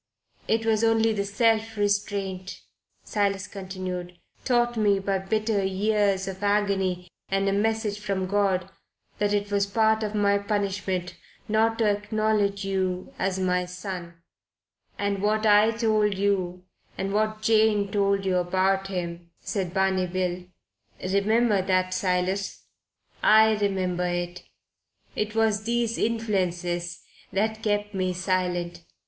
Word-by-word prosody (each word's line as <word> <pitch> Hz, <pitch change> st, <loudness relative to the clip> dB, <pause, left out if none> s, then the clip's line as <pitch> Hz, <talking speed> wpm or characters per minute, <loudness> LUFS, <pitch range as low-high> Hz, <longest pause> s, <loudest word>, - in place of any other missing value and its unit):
"It 225 Hz, 0 st, +1 dB
was 220 Hz, 0 st, +2 dB
only 225 Hz, 0 st, +3 dB
the 200 Hz, -1 st, -1 dB
self 225 Hz, +1 st, +1 dB
restraint," 200 Hz, -2 st, -2 dB, 0.4 s
Silas 200 Hz, -2 st, 0 dB
continued, 185 Hz, -2 st, -6 dB, 0.3 s
"taught 240 Hz, -1 st, +2 dB
me 205 Hz, -3 st, +3 dB
by 195 Hz, 0 st, -1 dB
bitter 215 Hz, +1 st, 0 dB
years 195 Hz, 0 st, +1 dB
of 190 Hz, 0 st, -6 dB
agony 195 Hz, -3 st, 0 dB, 0.2 s
and 195 Hz, 0 st, +1 dB
a 195 Hz, -, +2 dB
message 215 Hz, 0 st, 0 dB
from 195 Hz, -3 st, -2 dB
God 190 Hz, -2 st, +1 dB, 0.5 s
that 205 Hz, 0 st, +1 dB
it 205 Hz, 0 st, -1 dB
was 200 Hz, 0 st, +2 dB
part 220 Hz, +1 st, +2 dB
of 215 Hz, -1 st, -3 dB
my 200 Hz, -1 st, +3 dB
punishment 195 Hz, -3 st, -2 dB, 0.3 s
not 225 Hz, +1 st, +2 dB
to 230 Hz, -, +2 dB
acknowledge 205 Hz, -1 st, 0 dB
you 185 Hz, -2 st, -2 dB
as 190 Hz, 0 st, 0 dB
my 180 Hz, -1 st, +1 dB
son 180 Hz, -1 st, -7 dB, 0.4 s
" -, -, -44 dB
"And 200 Hz, -1 st, -1 dB
what 215 Hz, +1 st, +1 dB
I 210 Hz, +1 st, +6 dB
told 215 Hz, -3 st, +1 dB
you, 185 Hz, -3 st, 0 dB, 0.3 s
and 195 Hz, +1 st, -2 dB
what 215 Hz, +1 st, 0 dB
Jane 215 Hz, -2 st, +3 dB
told 200 Hz, -1 st, +1 dB
you 185 Hz, -1 st, +2 dB
about 190 Hz, +2 st, +1 dB
him," 170 Hz, -2 st, -5 dB
said 190 Hz, -4 st, -3 dB
Barney 190 Hz, -1 st, +1 dB
Bill. 180 Hz, 0 st, -2 dB, 0.7 s
"Remember 210 Hz, +1 st, +3 dB
that, 185 Hz, -1 st, +1 dB
Silas." 185 Hz, +1 st, -1 dB, 0.6 s
"I 220 Hz, 0 st, +6 dB
remember 185 Hz, -3 st, 0 dB
it 175 Hz, 0 st, -3 dB, 0.7 s
it 210 Hz, +1 st, -2 dB
was 215 Hz, -1 st, +1 dB
these 235 Hz, -1 st, 0 dB
influences 180 Hz, -6 st, -1 dB, 0.3 s
that 220 Hz, +2 st, -1 dB
kept 205 Hz, -1 st, -1 dB
me 185 Hz, -1 st, -1 dB
silent. 180 Hz, -2 st, -1 dB
200 Hz, 130 wpm, -26 LUFS, 185-215 Hz, 0.7 s, I